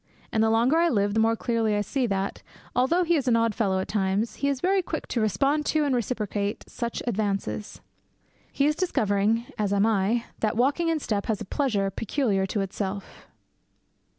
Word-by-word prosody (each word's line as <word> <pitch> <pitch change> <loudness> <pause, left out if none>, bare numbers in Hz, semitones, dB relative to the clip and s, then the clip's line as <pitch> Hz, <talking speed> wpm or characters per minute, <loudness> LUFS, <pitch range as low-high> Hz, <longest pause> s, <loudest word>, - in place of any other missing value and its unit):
And 220 - +1
the 220 - +3
longer 235 +7 +3
I 340 +1 +4
live 205 -5 +1
the 220 - +1
more 225 +1 +3
clearly 225 -2 0
I 205 - +1
see 250 +5 -1
that, 195 -1 -2 0.3
although 265 +9 +3
he 340 0 +2
is 270 -3 -2
an 240 - +4
odd 230 -1 +2
fellow 195 -4 0
at 190 - -2
times, 205 +2 -1
he 280 - 0
is 280 -2 0
very 380 +5 +2
quick 330 -2 -4
to 235 - 0
respond 275 +9 +1
to 310 -1 +2
and 280 - +1
reciprocate 210 -4 -2
such 235 -1 -4
advances. 210 -2 -2 0.7
He 275 - +1
is 300 +1 +2
discovering, 220 - +1
as 205 -2 0
I 200 - +2
am, 215 +2 +2 0.2
that 220 0 0
walking 280 +7 +2
in 325 -1 +1
step 210 -7 -2
has 215 -3 0
a 215 - -6
pleasure 205 -5 0
peculiar 205 -3 0
to 200 +1 -1
itself. 195 0 -5
225 Hz, 195 wpm, -26 LUFS, 200-265 Hz, 0.7 s, I